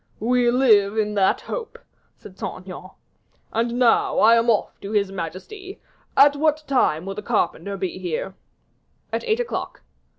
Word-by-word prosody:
"We 245 +2 +2
will 240 - +2
live 215 -5 +4
in 210 -1 0
hope," 320 - -1 0.4
said 190 - -14
Saint - - -5
Aignan; 185 0 -9 0.6
"and 235 +2 -1
now 245 -2 +3
I 230 +2 +6
am 230 +1 +2
off 215 -3 0
to 200 +2 -6
his 200 -2 +1
majesty. 195 - -7 0.4
At 285 +1 +6
what 305 +1 +1
time 185 - +1
will 195 - -4
the 210 - -6
carpenter 205 -2 -1
be 185 -1 -4
here?" 180 +1 -4 0.8
"At - - -1
eight 445 0 +1
o'clock." 485 - -4
220 Hz, 160 wpm, -22 LUFS, 195-265 Hz, 0.8 s, I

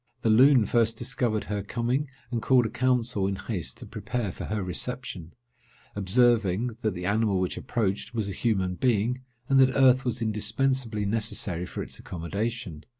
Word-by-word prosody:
The 110 - +3
Loon 125 +1 +6
first 115 +1 +2
discovered 120 -3 -1
her 105 -1 -3
coming, 120 +7 -2 0.2
and 120 -2 -1
called 125 +1 +4
a 110 - -3
council 125 -4 0
in 100 - -1
haste 95 -5 -5
to - - -9
prepare 120 -6 -4
for - - -7
her 105 -2 -2
reception; 90 - -3 0.6
observing, 110 +1 +2
that 110 -4 -1
the 90 0 -5
animal 100 -1 +1
which 90 -1 -1
approached 105 -5 -2
was 110 -4 -2
a - - -3
human 95 -4 0
being, 120 +3 0 0.3
and 135 0 +4
that 130 0 +4
earth 130 -1 +5
was 125 -2 -1
indispensably 115 0 0
necessary 100 -5 0
for - - -5
its - - -8
accommodation. 90 0 -4
110 Hz, 165 wpm, -27 LUFS, 100-125 Hz, 0.6 s, Loon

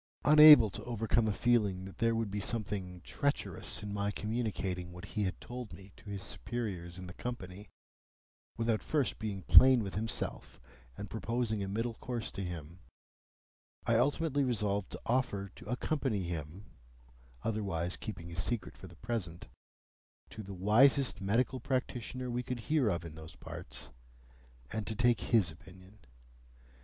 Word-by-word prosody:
Unable 150 -6 +10
to - - -6
overcome 115 -1 +1
a - - +2
feeling 105 -5 +1
that 95 - -11
there 115 -1 +2
would 115 -3 -1
be 105 - -2
something 100 -5 -4
treacherous 140 -2 -1
in 105 -1 -4
my 100 0 -1
communicating 95 -5 -3
what 90 +1 -9
he 105 -2 0
had 95 - -3
told 120 -2 -7
me 95 0 -12
to 105 - -13
his 100 -2 -5
superiors 90 -1 -4
in 95 - -7
the 90 - -8
Company, 100 -4 -7 0.9
without 115 -1 +1
first 145 -5 0
being 100 -4 -4
plain 130 +5 +8
with 95 - -5
himself 110 +3 -4 0.4
and 105 - -7
proposing 115 -1 -1
a 100 - -2
middle 115 +4 -2
course 120 0 -4
to 95 - -5
him, 85 -1 -7 1.1
I 115 - +3
ultimately 145 +3 +2
resolved 105 -6 0
to - - -7
offer 110 -6 0
to - - -13
accompany 125 -5 -1
him 85 +3 -5 0.8
(otherwise 95 -6 -1
keeping 85 -6 -7
his 85 +1 -2
secret 120 +1 -3
for 95 - -9
the 85 - -14
present) 95 -5 -4 0.8
to 110 - -7
the 100 -1 -8
wisest 115 +5 +4
medical 120 +6 +1
practitioner 125 -1 -3
we 120 +1 -1
could 125 -1 -4
hear 145 -2 +2
of 85 -3 -2
in 80 - -8
those 80 +1 -11
parts, 60 -6 -9 0.8
and 110 -1 -3
to 110 - -3
take 120 +1 +3
his 105 -9 +3
opinion. 90 +4 -16
105 Hz, 155 wpm, -33 LUFS, 95-120 Hz, 1.1 s, Unable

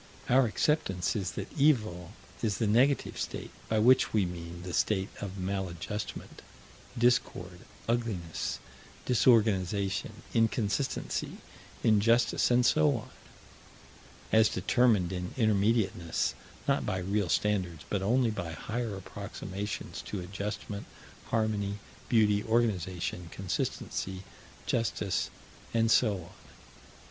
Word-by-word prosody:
Our 130 0 +5
acceptance 105 - 0
is 95 -4 -2
that 100 - -6
Evil 110 - +2 0.3
is 105 -4 0
the 115 - +1
negative 125 +7 +2
state, - - -4 0.2
by 110 - +2
which 125 +4 +5
we 105 -3 +3
mean 85 0 -7
the 90 -1 -6
state 95 -2 +1
of 100 -1 -5
maladjustment, 95 +1 -4 0.6
discord, 95 -7 +1 0.3
ugliness, 110 -9 -1 0.5
disorganization, 105 -4 +2
inconsistency, 115 +2 0 0.5
injustice, 115 +2 +4
and 125 0 +4
so 75 -9 +4
on - - -9 1.2
as 110 -1 +6
determined 105 -2 +2
in 90 -1 -4
Intermediateness, 105 -6 +1 0.3
not - - +2
by 95 - -1
real 95 0 0
standards, 90 -5 0
but 100 - -1
only 115 +4 +2
by 85 -6 -4
higher 110 +4 -3
approximations 100 +1 -6
to 105 - -3
adjustment, 100 +2 -5 0.4
harmony, 105 -3 0 0.3
beauty, 105 -3 +4
organization, 95 -6 0
consistency, 95 0 -3 0.4
justice, 105 -5 0 0.5
and 115 0 +3
so 110 -4 +5
on. 85 -3 -9
105 Hz, 105 wpm, -30 LUFS, 95-115 Hz, 1.2 s, as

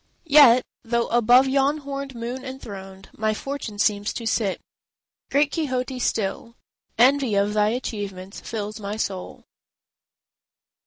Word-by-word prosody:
Yet—though 250 -5 +4
above 240 +3 +5
yon 275 +2 +2
horned 275 -2 -6
moon 240 +3 -5
enthroned 195 -8 -9
My 215 0 0
fortune 270 -5 -5
seems 205 0 +1
to 230 - -6
sit—great 230 +6 -3
Quixote, 260 -5 -2
still 225 +1 -2 0.4
Envy 255 -1 +4
of 200 +1 +1
thy 210 0 +3
achievements 205 -5 -5
fills 215 -1 -5
my 205 +1 -5
soul. 190 -4 -4
235 Hz, 110 wpm, -23 LUFS, 205-265 Hz, 0.4 s, above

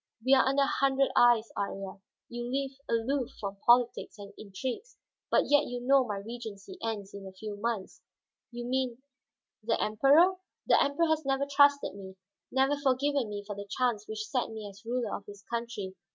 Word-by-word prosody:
"We 265 - +5
are 265 - +6
under 275 +1 +3
a - - +3
hundred 275 0 +2
eyes, 240 -2 +5
Iría. 195 -1 -4 0.3
You 240 +1 -5
live 275 0 -1 0.2
aloof 240 +3 0
from 200 -1 -5
politics 240 +2 +2
and 200 0 -10
intrigues, 255 - -6 0.3
but - - +4
yet 290 +1 +4
you 245 0 -4
know 265 +2 +4
my 210 -5 -4
regency 225 - -8
ends 210 -3 -4
in 200 -1 -8
a - - -9
few 205 +2 -7
months." 210 -2 -4 0.5
"You 240 0 -6
mean 255 0 -2 0.6
the 225 +1 0
Emperor?" 285 - +4 0.3
"The - - +5
Emperor 285 +4 +1
has 315 -1 +1
never 270 0 0
trusted 285 0 +4
me, 190 -1 -10 0.4
never 270 +2 +2
forgiven 275 -2 +1
me 205 -1 -5
for 205 0 -6
the 200 0 -8
chance 220 -2 -1
which 215 0 -4
set 250 +1 -1
me 220 -2 -7
as 200 +1 -13
ruler 235 -2 -2
of 200 - -9
his 205 -1 -11
country. 230 -5 -5
240 Hz, 180 wpm, -30 LUFS, 205-270 Hz, 0.6 s, are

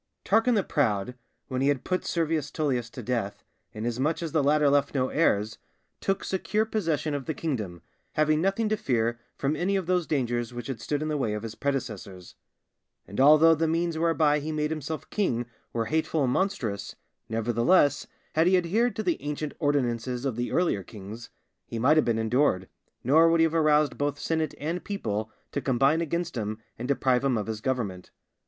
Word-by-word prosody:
_ - - -12
Tarquin 225 +2 +4
the 200 - +2
Proud, 120 - 0 0.3
when 130 0 -2
he 135 - +2
had 140 -2 +1
put 185 -1 -1
Servius 160 -3 -1
Tullius 130 -7 -1
to 125 - -8
death, 105 -4 -2 0.3
inasmuch 120 +9 -1
as 165 - -3
the 155 - +2
latter 150 +1 +4
left 140 0 +2
no 130 -1 +1
heirs, 110 -9 +1 0.4
took 195 0 -1
secure 210 +3 0
possession 165 -9 -1
of 140 -2 -3
the 160 - -3
kingdom, 105 - -4 0.3
having 155 0 +2
nothing 195 +4 +1
to 215 - +2
fear 120 - 0 0.2
from 140 +2 0
any 185 +5 0
of 190 -2 0
those 180 -1 +1
dangers 120 -4 -1
which 120 -1 -5
had 125 -3 -5
stood 145 +4 -2
in - - -2
the 155 -1 -1
way 110 -5 0
of 105 - -5
his 115 -1 -5
predecessors. 110 -10 -4 0.7
And 100 - -6
although 155 +3 +7
the 165 +1 +1
means 165 +1 0
whereby 160 -2 +2
he 155 +2 -4
made 150 0 -1
himself 155 0 -4
king 120 - 0 0.3
were 115 -1 -1
hateful 160 +2 0
and 125 -1 +1
monstrous, 130 - -2 0.3
nevertheless, 120 +7 +2 0.3
had 160 +2 +3
he 185 0 +5
adhered 215 +8 +1
to 220 - -2
the 175 -4 0
ancient 150 0 -4
ordinances 125 -4 0
of 130 -5 -1
the 120 +1 -2
earlier 170 - +1
kings, 105 +4 -10 0.4
he 115 - -5
might 130 +7 +4
have 155 - +4
been 115 -2 +1
endured, 110 -4 +1 0.4
nor 160 +6 +5
would 165 0 +3
he - - +6
have 165 -1 +2
aroused 155 -2 +3
both 145 0 0
senate 160 0 -1
and 165 +5 -3
people 110 - -3 0.2
to 140 - -2
combine 135 +5 +2
against 170 +1 -2
him 110 -1 -3 0.2
and 125 - -4
deprive 130 -2 +2
him 135 -4 +2
of 105 - -2
his 110 -1 -4
government. 105 -9 -2
145 Hz, 195 wpm, -27 LUFS, 120-160 Hz, 0.7 s, although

